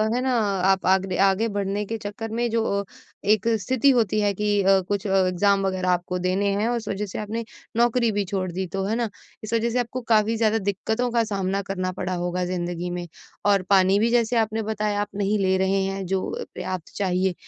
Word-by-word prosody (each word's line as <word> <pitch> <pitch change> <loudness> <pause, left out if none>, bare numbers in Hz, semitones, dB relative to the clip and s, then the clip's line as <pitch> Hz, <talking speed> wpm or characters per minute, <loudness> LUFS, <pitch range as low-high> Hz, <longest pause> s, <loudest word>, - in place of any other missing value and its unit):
है 250 - 0
ना, 260 0 0
आप 195 -2 +1
आग 190 0 +4
दे 185 -1 -3
आगे 195 +4 +1
बढ़ने 200 +1 -1
के 225 +3 -4
चक्कर 215 +1 -6
में 240 0 +1
जो 210 -3 0 0.4
एक 215 0 +3
स्थिति 260 +7 +2
होती 220 -4 +2
है 205 -1 +2
कि 205 +1 +1
अ, 195 0 +5
कुछ 205 0 -2
अ, 195 - +1
एग्ज़ाम 195 +2 +2
वगैरह 185 -1 -1
आपको 180 0 0
देने 185 +3 0
हैं, 215 - +1
उस 235 -3 -2
वजह 200 +1 -2
से 195 - -6
आपने 215 +2 -3 0.3
नौकरी 235 0 +3
भी 205 -1 -1
छोड़ 185 -1 -2
दी 190 +2 -3
तो, 195 +2 -3
है 215 +3 0
ना, 235 -2 -1 0.3
इस 215 +1 -5
वजह 230 +1 +2
से 245 +2 0
आपको 245 +1 -3
काफ़ी 215 +1 +3
ज़्यादा 220 0 +2
दिक्कतों 220 +4 -1
का 235 -1 +2
सामना 195 -2 -1
करना 185 -1 -1
पड़ा 185 0 -3
होगा 180 +1 -1
ज़िंदगी 175 -1 -3
में। 175 0 -4 0.4
और 200 -1 +4
पानी 195 0 +5
भी, 225 +2 +2
जैसे 235 0 +2
आपने 220 0 +1
बताया, 210 -1 -1
आप 205 - -2
नहीं 205 +1 +1
ले 190 -1 +2
रहे 190 +1 +1
हैं 195 0 -3
जो 190 +1 -1
अ, - - -4
पर्याप्त 185 -3 -6
चाहिए, 185 -1 +1
200 Hz, 220 wpm, -24 LUFS, 190-220 Hz, 0.4 s, अ